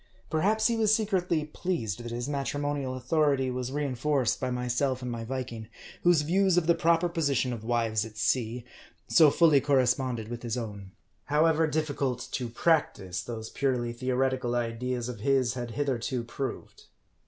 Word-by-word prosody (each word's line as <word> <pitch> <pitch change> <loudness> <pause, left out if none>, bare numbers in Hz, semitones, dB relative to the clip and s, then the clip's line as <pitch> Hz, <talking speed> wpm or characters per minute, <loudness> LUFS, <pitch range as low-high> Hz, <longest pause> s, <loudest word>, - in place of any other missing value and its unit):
Perhaps 210 +7 +2
he 235 - +3
was 220 -2 +2
secretly 185 -8 0
pleased 150 - -3
that 120 - -6
his 120 +2 -3
matrimonial 145 -1 -2
authority 135 0 +1
was 125 0 -3
rein 145 -1 -1
forced 130 -2 +1
by 130 - -1
myself 125 +1 -1
and 125 - -3
my 115 -1 -4
Viking, 120 -2 -5 0.3
whose 175 -4 +4
views 185 +3 +2
of 175 - +3
the 170 - +5
proper 165 +1 +2
position 140 -7 0
of 115 -2 -7
wives 115 -2 0
at 110 -1 -10
sea, 115 +2 0 0.4
so 160 -3 +6
fully 155 -2 +5
corresponded 130 -4 +1
with 120 0 -6
his 120 0 -3
own; 100 -5 -6 0.4
however 160 +2 +3
difficult 140 -5 -2
to 125 -3 -3
practice, 115 - 0
those 110 -2 -7
purely 125 -4 -1
theoretical 130 0 0
ideas 120 +1 -2
of 125 -3 -6
his 130 0 +2
had 120 -2 -5
hitherto 130 -3 -1
proved. 130 +3 -6
130 Hz, 160 wpm, -28 LUFS, 120-150 Hz, 0.4 s, so